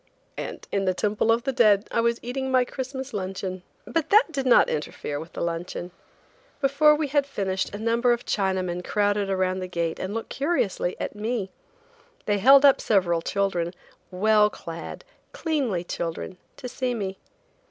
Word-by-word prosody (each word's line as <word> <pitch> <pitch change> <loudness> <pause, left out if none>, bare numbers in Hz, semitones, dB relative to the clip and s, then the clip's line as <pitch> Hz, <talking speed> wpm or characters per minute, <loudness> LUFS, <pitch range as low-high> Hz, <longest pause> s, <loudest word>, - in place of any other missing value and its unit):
And - - -6
in 195 -1 0
the 185 -1 +1
Temple 210 +3 +1
of 230 +1 +2
the 270 - 0
Dead 210 -5 +4
I 230 - +2
was 235 0 +1
eating 265 +2 -3
my 255 -1 +3
Christmas 265 +1 -6
luncheon. 185 -1 -4 0.2
But 330 -3 -1
that 425 -3 +5
did 270 -4 -2
not 245 - +6
interfere 150 -1 -4
with 160 +2 -10
the - - -5
luncheon. 170 +1 -4 0.7
Before 290 +2 +4
we 300 -1 -2
had 285 0 +1
finished 190 -7 -2
a 205 - -7
number 230 +3 +2
of 240 0 -1
Chinaman 185 -3 -1
crowded 205 0 0
around 185 -1 0
the 185 - -4
gate 170 -2 -2
and 190 - -3
looked 225 - -4
curiously 270 - -1
at - - -3
me. 210 -2 -3 0.7
They 205 -1 +1
held 275 +6 +7
up 275 - +6
several 175 -5 +2
children, 180 -2 -1 0.3
well 210 +3 +4
clad, 165 -4 -8 0.3
cleanly 270 - -1
children, 170 +1 -5 0.2
to 250 - -6
see 250 0 -2
me. 195 -3 -4
210 Hz, 170 wpm, -25 LUFS, 185-255 Hz, 0.7 s, held